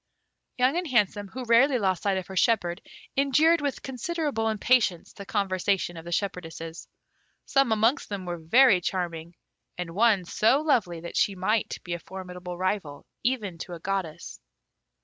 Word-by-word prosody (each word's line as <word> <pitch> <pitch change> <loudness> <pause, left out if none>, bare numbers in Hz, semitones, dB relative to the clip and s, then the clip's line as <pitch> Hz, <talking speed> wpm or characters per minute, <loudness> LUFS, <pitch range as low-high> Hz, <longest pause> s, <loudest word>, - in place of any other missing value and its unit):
Young 255 +6 +2
and 355 -1 -2
Handsome, 210 -5 +1
who 255 +7 -7
rarely 245 +4 +5
lost 190 -5 0
sight 195 -2 +1
of 185 - -4
her 190 - -9
shepherd, 185 -3 +1 0.3
endured 300 +5 +4
with 285 -2 -3
considerable 270 -3 -2
impatience 215 -4 +1
the 200 -1 -10
conversation 190 -2 0
of 165 0 -9
the 175 - -7
shepherdesses. 165 -3 -4 0.6
Some 275 -4 +2
amongst 225 +5 +2
them 200 -3 -5
were 175 -1 -4
very 200 +4 +5
charming, 170 -2 -3 0.4
and 180 -2 -4
one 205 -2 +3
so 225 +9 +3
lovely 205 - +1
that 170 - -6
she 200 - +2
might 205 +4 0
be 175 - -4
a 170 - -3
formidable 180 -1 -8
rival 185 -6 -2 0.2
even 215 -9 -2
to 175 - -7
a 170 - -7
goddess. 190 -3 -4
200 Hz, 160 wpm, -26 LUFS, 175-240 Hz, 0.6 s, rarely